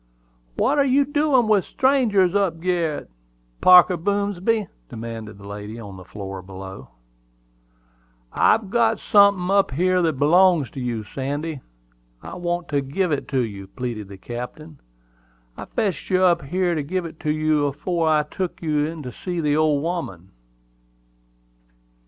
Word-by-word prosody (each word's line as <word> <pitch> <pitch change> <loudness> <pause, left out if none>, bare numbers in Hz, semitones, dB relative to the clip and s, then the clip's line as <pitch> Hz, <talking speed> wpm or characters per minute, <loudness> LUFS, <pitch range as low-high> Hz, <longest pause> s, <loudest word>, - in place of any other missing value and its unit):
"What 290 +1 +2
are - - +5
you 275 +1 +3
doin' 290 -4 +2
with 210 -3 +3
strangers 230 -9 +2
up 195 -5 0
gerret, 170 -3 -1 0.5
Parker 180 0 +7
Boomsby?" 200 +3 0 0.2
demanded 110 -2 -7
the 100 - -13
lady 105 +2 -7
on 100 -4 -9
the 95 - -11
floor 95 0 -7
below. 95 +1 -10 1.4
"I've 205 -4 +2
got 225 -1 +2
sunthin' 200 -3 +4
up 200 0 +3
here 180 +6 +1
that 165 -2 +1
belongs 170 0 +4
to - - -7
you, 120 -3 -3
Sandy; 145 +5 -4 0.6
I - - -8
want 175 -1 -3
to 145 -2 +1
give 160 +7 -1
it 145 - -2
to 135 -2 0
you," 100 -4 -5
pleaded 115 -1 -5
the 100 0 -11
captain. 125 +8 -8 0.8
"I - - -8
fetched 195 -8 -2
you 185 -1 +2
up 170 -4 +3
here 180 +3 0
to 155 - -1
give 175 +5 -3
it 165 -1 -9
to 155 - -3
you 155 -1 +1
afore 160 +3 -1
I 155 -1 +3
took 180 +4 -5
you 150 -2 +1
in 160 -1 -7
to 125 - -6
see 175 +6 -5
the 150 -2 +1
old 150 -2 +2
woman." 130 - -4
160 Hz, 155 wpm, -22 LUFS, 130-185 Hz, 1.4 s, Parker